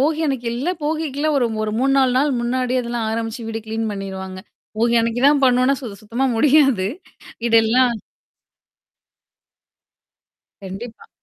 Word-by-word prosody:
போகி 310 Hz, +3 st, +1 dB
அன்னிக்கு 260 Hz, -4 st, -2 dB
எல்லா 280 Hz, +10 st, -1 dB
போகிக்குல்லாம் 305 Hz, -1 st, -1 dB
ஒரு 245 Hz, -, +2 dB, 0.2 s
ஒரு 215 Hz, -, -2 dB
3-4 265 Hz, -1 st, +3 dB
நாள் 290 Hz, +1 st, +2 dB
முன்னாடியே 255 Hz, +1 st, 0 dB
அதெல்லாம் 235 Hz, -2 st, -3 dB
ஆரம்பிச்சு 225 Hz, 0 st, -4 dB
வீடு 225 Hz, 0 st, -4 dB
கிளீன் 220 Hz, 0 st, -2 dB
பண்ணிருவாங்க. 190 Hz, -1 st, -6 dB, 0.4 s
போகி 235 Hz, +1 st, +2 dB
அனைக்கு 230 Hz, +1 st, -1 dB
தான் 285 Hz, -1 st, +4 dB
பண்ணுவோனா 255 Hz, +2 st, +3 dB
சுத்த 220 Hz, -6 st, -7 dB
சுத்தமா 235 Hz, +5 st, -1 dB
முடியாது 270 Hz, -7 st, +4 dB, 0.6 s
வீடெல்லாம். 235 Hz, +2 st, +4 dB, 2.7 s
கண்டிப்பா. 195 Hz, +5 st, -9 dB
240 Hz, 125 wpm, -20 LUFS, 225-270 Hz, 2.7 s, தான்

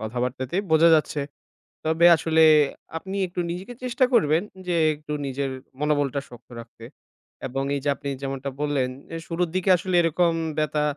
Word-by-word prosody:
কথাবার্তাতেই 125 Hz, -, -3 dB
বোঝা 160 Hz, +1 st, +6 dB
যাচ্ছে। 155 Hz, -1 st, 0 dB, 0.7 s
তবে 160 Hz, +2 st, +3 dB
আসলে 160 Hz, 0 st, +1 dB, 0.6 s
আপনি 190 Hz, +4 st, -6 dB
একটু 175 Hz, 0 st, -7 dB
নিজেকে 185 Hz, +7 st, -6 dB
চেষ্টা 255 Hz, +1 st, +2 dB
করবেন 165 Hz, -5 st, +3 dB, 0.2 s
যে 175 Hz, -, 0 dB, 0.2 s
একটু 150 Hz, 0 st, -7 dB
নিজের 135 Hz, 0 st, -3 dB, 0.3 s
মনোবলটা 145 Hz, -2 st, 0 dB
শক্ত 120 Hz, 0 st, -15 dB
রাখতে 115 Hz, -1 st, -13 dB, 0.6 s
এবং 135 Hz, +2 st, -3 dB
এইযে 140 Hz, +1 st, -2 dB
আপনি 140 Hz, -, -6 dB
যেমনটা 135 Hz, 0 st, -4 dB
বললেন, 145 Hz, -3 st, 0 dB, 0.3 s
এ -, -, -3 dB
শুরুর 170 Hz, 0 st, -1 dB
দিকে 185 Hz, +1 st, 0 dB
আসলে 180 Hz, +1 st, -2 dB
এরকম 170 Hz, +1 st, +2 dB, 0.2 s
ব্যথা 150 Hz, -1 st, 0 dB
150 Hz, 150 wpm, -24 LUFS, 135-170 Hz, 0.7 s, বোঝা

